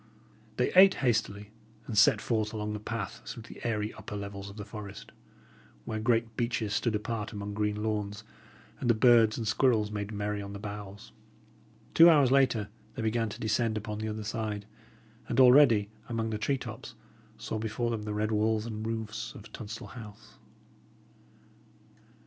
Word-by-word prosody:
They 125 - +1
ate 190 +1 +8
hastily, 105 -3 0 0.3
and 115 - -5
set 105 - +6
forth 110 -2 -1
along 105 -1 -3
the 105 - -4
path 110 +1 -5
through 115 - -8
the 120 - -12
airy 105 -2 -1
upper - - -8
levels 100 -1 -6
of 100 - -12
the 105 - -6
forest, 105 -2 -9 0.7
where 110 - -3
great 115 0 +1
beeches 115 -3 -1
stood 115 0 0
apart 105 0 -3
among 100 0 -5
green 105 0 -1
lawns, 105 -2 -2 0.6
and 120 - -1
the 115 - +5
birds 115 -1 +5
and 115 -2 -3
squirrels 110 -2 +2
made 105 0 -4
merry 105 0 -2
on 100 0 -7
the - - -5
boughs. 105 -1 -8 0.8
Two 165 +1 +9
hours 145 -6 +5
later, 130 -6 +3 0.3
they 120 - -4
began 115 0 0
to - - -8
descend 110 0 0
upon 105 0 -5
the 110 - -3
other 110 0 -4
side, 105 -1 -3 0.6
and - - 0
already, 125 -5 +7 0.2
among 115 -1 -2
the 105 - -3
tree 135 +5 0
tops, - - -8 0.4
saw 110 - -4
before 115 +2 -2
them 115 -2 -2
the 105 0 -4
red 105 +1 0
walls 110 0 +1
and 110 -1 -5
roofs 110 -1 -4
of 105 +1 -12
Tunstall 110 0 -7
House. 110 -3 -12
110 Hz, 170 wpm, -29 LUFS, 105-115 Hz, 0.8 s, Two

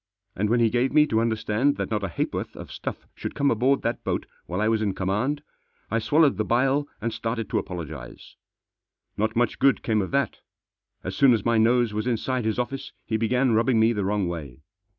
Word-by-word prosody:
And 105 +2 0
when 120 +2 +3
he 115 -2 +3
gave 125 +2 +1
me 150 0 +6
to 110 -6 +1
understand 115 +4 +1
that - - -3
not 105 -2 -1
a - - 0
ha'porth 85 - -3
of - - -9
stuff - - -6
should - - -6
come 140 -1 +2
aboard 130 +5 +2
that 115 - -2
boat - - -2 0.2
while 90 +2 -3
I 110 - +2
was 110 -1 +2
in 100 -3 -1
com* 95 -1 -2
foand* 130 +9 0 0.5
I 115 - +2
swallowed 145 +5 +3
the 110 - +1
bile 135 +6 +1
and 115 +1 -2
started 115 -1 -3
to - - +2
apologise. 80 -8 -8 0.8
Not 110 +1 -1
much 120 -1 +1
good 135 -1 +3
came 110 -2 +1
of 95 - -3
that 140 -4 0 0.6
As 90 +1 -4
soon 130 +3 +6
as 105 - -4
my 115 -1 +3
nose 120 0 +3
was 110 +3 -2
Inside 125 +1 -1
his 110 - 0
office 125 +2 -3
he 110 - -2
began 125 +3 +2
rubbing 115 +1 +3
me 110 +1 +4
the 105 -3 -1
Wrong 100 -1 0
way. 75 -5 -6
115 Hz, 215 wpm, -25 LUFS, 105-125 Hz, 0.8 s, me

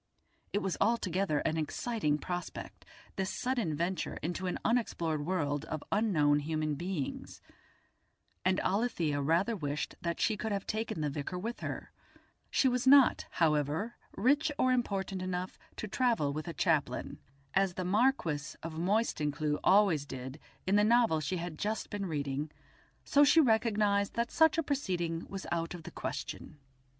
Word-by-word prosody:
It 205 - 0
was 190 -2 -1
altogether 195 -8 +1
an 160 0 0
exciting 160 0 -1
prospect, 180 +3 -6 0.3
this 190 -1 -1
sudden 240 - -1
venture 170 +2 -2
into 175 +3 -2
an 180 - -1
unexplored 165 -10 0
world 145 -6 0
of 155 -2 -5
unknown 155 -9 +3
human 155 0 -1
beings, 170 -1 -4 1.0
and 185 +1 +2
Alethia 180 -9 0
rather 170 +10 +2
wished 145 -5 -3
that 170 -1 -2
she 220 - +2
could 220 +1 -3
have 200 -1 -2
taken 220 -7 -2
the 150 -1 0
vicar 145 +5 -4
with 230 +6 -4
her; - - -5 0.6
she 270 - +3
was 250 0 +1
not, 275 -1 +6
however, 155 +6 +1 0.2
rich 285 +8 +3
or 255 - +3
important 195 -6 -1
enough 185 0 -4 0.2
to 215 - -5
travel 225 - +1
with 155 +3 -5
a 170 - -4
chaplain, 150 -7 0 0.3
as 195 -2 +2
the 185 - -3
Marquis 185 - +1
of 165 0 -5
Moystoncleugh 155 -6 0
always 185 -7 +4
did 130 +2 -7 0.3
in 195 +2 +3
the 205 - +5
novel 230 -7 +4
she 155 +5 -2
had 170 -2 -5
just 215 +2 -2
been 200 -2 -3
reading, 145 -1 -2 0.6
so 285 - +5
she 295 +3 +6
recognised 215 -6 +2
that 235 0 -1
such 320 -1 +4
a 330 - +2
proceeding 180 - -2
was 195 -1 -6
out 170 0 -1
of 170 - -10
the - - -8
question. 135 +2 -5
185 Hz, 155 wpm, -32 LUFS, 155-220 Hz, 1.0 s, not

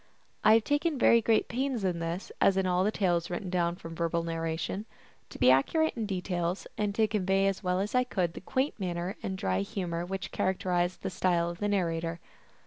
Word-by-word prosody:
I 215 - +7
have 225 - +3
taken 290 +3 0
very 235 -1 +5
great 220 0 +2
pains 255 -2 -2
in 180 -3 0
this, 170 +3 -4
as 195 - +4
in 190 - +2
all 180 0 +2
the 210 - +2
tales 175 -5 0
written 180 +1 -4
down 170 -1 +1
from 165 -2 -9
verbal 170 0 -1
narration, 165 +5 -3 0.4
to - - -10
be 125 +1 +6
accurate 315 - +3
in 225 -3 -2
details, 180 -2 -2
and 205 -1 -1
to 220 0 +3
convey 195 -2 +1
as 195 -1 0
well 180 -1 0
as 205 +2 -2
I 250 0 +4
could 180 -9 -1
the - - -8
quaint 260 +6 -1
manner 180 0 -3
and 190 0 -3
dry 95 - 0
humor 170 - -3
which 195 +2 -5
characterized 180 -1 0
the - - -2
style 170 -2 +1
of 170 - -10
the 205 - 0
narrator. 170 -4 -1
185 Hz, 210 wpm, -29 LUFS, 170-205 Hz, 0.4 s, I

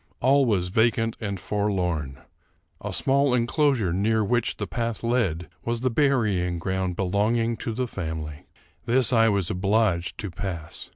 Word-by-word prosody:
All 135 +2 +4
was 90 -5 +1
vacant 115 +2 +2
and 100 -3 -3
forlorn. 90 -10 -2 0.6
A - - -3
small 135 -1 +2
enclosure 120 - +1
near 110 +4 +1
which 120 +2 0
the - - -3
path 115 -2 -3
led 105 -9 0 0.2
was 120 0 -2
the 130 -1 +1
burying 110 - +1
ground 95 +1 -2
belonging 110 +5 +1
to - - -4
the 125 +3 -2
family. 80 -7 -6 0.4
This 125 +1 +2
I 115 -1 +5
was 100 -4 0
obliged 95 -2 +1
to 100 -3 -5
pass. 85 -4 -6
105 Hz, 150 wpm, -25 LUFS, 90-120 Hz, 0.6 s, I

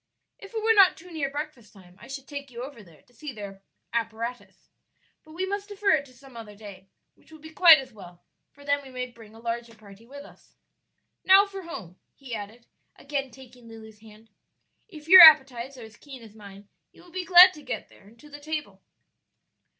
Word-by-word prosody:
If 400 - -13
it 440 - -4
were 450 0 +3
not 390 -4 +5
too 360 +2 -15
near 300 -4 -4
breakfast 290 -6 -8
time 180 -3 -19
I - - -13
should 270 0 -9
take 280 -1 -9
you 240 0 -9
over 265 -4 -11
there 170 -6 -21
to 245 - -30
see 285 +5 -9
their 200 -4 -11 0.3
apparatus; 230 +1 -6 0.5
but 310 - -17
we 365 +3 -3
must 405 +1 -6
defer 410 0 -1
it 295 -3 +1
to 255 - -20
some 265 0 -18
other 220 -3 -11
day, 200 -2 -14 0.2
which - - -27
will 315 - -13
be 315 +1 -14
quite 330 -1 +7
as 260 -4 -9
well, 180 -4 -15 0.3
for 285 0 -19
then 285 0 0
we 270 - -14
may 250 -1 -6
bring 225 -2 -17
a - - -15
larger 235 0 -6
party 210 +1 -18
with 285 +2 -12
us. - - -21 0.7
Now 385 +2 +6
for 390 -1 -10
home," 195 - -11 0.2
he 265 -4 -11
added, 220 +2 -9 0.3
again 275 -1 -5
taking 250 -1 -17
Lulu's 220 -1 -14
hand; 220 0 -19 0.6
"if 310 -7 -14
your 370 +2 +10
appetites 270 -5 +6
are 245 - -11
as 220 -1 -15
keen 270 -5 -13
as 220 -2 -15
mine 200 -2 -15 0.2
you - - -20
will 355 - -19
be 370 +1 -5
glad 365 +1 +7
to 300 - -14
get 260 -3 -7
there 195 - -21
and 230 +3 -21
to 295 - -17
the 290 - -11
table." 305 0 -7
260 Hz, 215 wpm, -25 LUFS, 220-310 Hz, 0.7 s, your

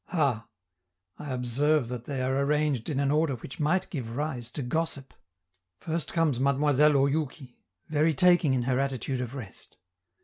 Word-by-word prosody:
Ha! 135 - 0 0.7
I 145 - -7
observe 130 +3 +1
that 125 -1 -6
they 135 -3 -3
are 130 +1 0
arranged 150 -4 0
in 140 -3 -1
an 140 0 +1
order 150 -2 +2
which 125 +3 -10
might 160 +5 +1
give 120 -7 -5
rise 140 -6 -3
to 145 - -3
gossip. 140 0 -3 0.7
First 165 0 -3
comes 160 -7 +1
Mademoiselle 145 +2 +3
Oyouki, 140 -2 -1 0.3
very 155 +1 +2
taking 175 -4 +4
in 125 - 0
her 130 +1 +1
attitude 135 -1 -2
of 125 +1 -5
rest! 110 -8 -10
140 Hz, 160 wpm, -28 LUFS, 130-150 Hz, 0.7 s, taking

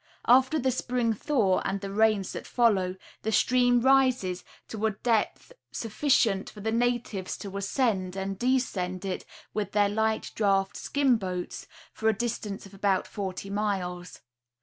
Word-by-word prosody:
After 260 +5 +5
the 260 -2 +1
spring 245 -2 0
thaw, 215 -5 +1
and 195 +1 -2
the 195 0 -6
rains 215 -2 +2
that - - -7
follow, 195 -7 +2 0.3
the 220 - -2
stream 245 +1 +3
rises 255 -8 +3 0.3
to 220 -1 -6
a - - +2
depth 225 - -1 0.2
sufficient 225 -3 +1
for 210 - -13
the 220 +2 -2
natives 235 -5 -1
to 200 -1 -8
ascend 200 -3 0
and 195 0 -4
descend 200 -8 0
it 190 -1 -3 0.3
with 210 -3 -3
their 205 -1 +3
light 220 +1 0
draught 195 -2 +1
skin 275 -4 +2
boats 185 -3 -5 0.3
for 220 - +1
a - - +3
distance 210 -4 -3
of 195 - -14
about 195 -1 +1
forty 195 -1 -5
miles. 185 -4 -3
210 Hz, 150 wpm, -28 LUFS, 195-240 Hz, 0.3 s, After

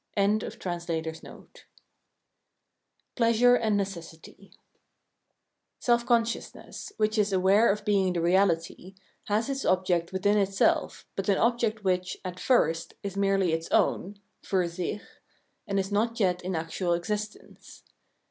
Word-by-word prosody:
] - - -42
349 175 -5 -2 1.7
Pleasuee 245 +1 +4
and 215 -2 +1
Necessity 190 0 -7 1.3
Self 235 0 +1
consciousness, 230 -2 -2
which, 215 0 +1
is 205 -1 +2
aware 195 +4 +4
of 210 +1 -4
being 195 -3 +2
the 175 - -1
reahty, 175 +1 +1 0.3
has 210 +2 0
its 275 -1 -3
object 180 -2 +1
within 200 +2 +2
itself, 195 -1 +1
but 195 +1 -2
an 195 - +3
object 230 -2 +1
which, 185 -1 -1
at 180 0 -6
first, 165 - +1
is 200 -1 -5
merely 195 -3 +2
its 165 0 -3
own 200 +2 +1 0.2
{fur 185 -2 0
sicli), 175 +4 -4 0.7
and 200 -1 0
is 195 +1 -3
not 230 +3 0
yet 180 -3 +1
in 185 0 -3
actual 165 +2 -1
existence. 210 +5 -5
195 Hz, 125 wpm, -27 LUFS, 180-215 Hz, 1.7 s, Pleasuee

